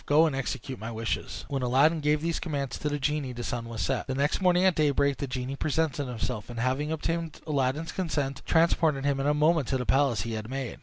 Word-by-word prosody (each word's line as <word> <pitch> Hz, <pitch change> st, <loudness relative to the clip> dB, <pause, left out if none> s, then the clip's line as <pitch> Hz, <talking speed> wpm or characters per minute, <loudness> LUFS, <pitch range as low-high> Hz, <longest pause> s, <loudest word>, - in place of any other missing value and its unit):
Go 150 Hz, +3 st, +6 dB
and 155 Hz, -4 st, 0 dB
execute 135 Hz, -1 st, -4 dB
my 110 Hz, +2 st, -5 dB
wishes." 115 Hz, 0 st, -3 dB
When 135 Hz, -2 st, -2 dB
Aladdin 140 Hz, +6 st, +3 dB
gave 150 Hz, 0 st, +2 dB
these 170 Hz, 0 st, 0 dB
commands 140 Hz, -5 st, -3 dB
to 150 Hz, -, -1 dB
the 145 Hz, -, -1 dB
genie 145 Hz, -2 st, -1 dB
the 120 Hz, 0 st, -6 dB
sun 115 Hz, -1 st, -3 dB
was 115 Hz, -2 st, -4 dB
set. 135 Hz, -2 st, -1 dB
The 130 Hz, -, -2 dB
next 140 Hz, +7 st, +1 dB
morning 180 Hz, 0 st, +4 dB
at 190 Hz, -, +5 dB
daybreak 140 Hz, -3 st, +2 dB
the 140 Hz, -, -3 dB
genie 125 Hz, +1 st, -3 dB
presented 150 Hz, -1 st, 0 dB
himself, 120 Hz, -2 st, -4 dB
and 120 Hz, -1 st, -6 dB
having 130 Hz, +5 st, 0 dB
obtained 165 Hz, 0 st, -2 dB
Aladdin's 145 Hz, +1 st, 0 dB
consent, 145 Hz, -7 st, -2 dB
transported 160 Hz, -4 st, +3 dB
him 140 Hz, -1 st, +1 dB
in 135 Hz, -, 0 dB
a 150 Hz, -, +3 dB
moment 155 Hz, -2 st, +3 dB
to 135 Hz, -, +1 dB
the 125 Hz, -, -3 dB
palace 135 Hz, -3 st, +2 dB
he 115 Hz, 0 st, -4 dB
had 110 Hz, 0 st, -5 dB
made. 135 Hz, -2 st, -4 dB
140 Hz, 235 wpm, -28 LUFS, 130-155 Hz, -, Go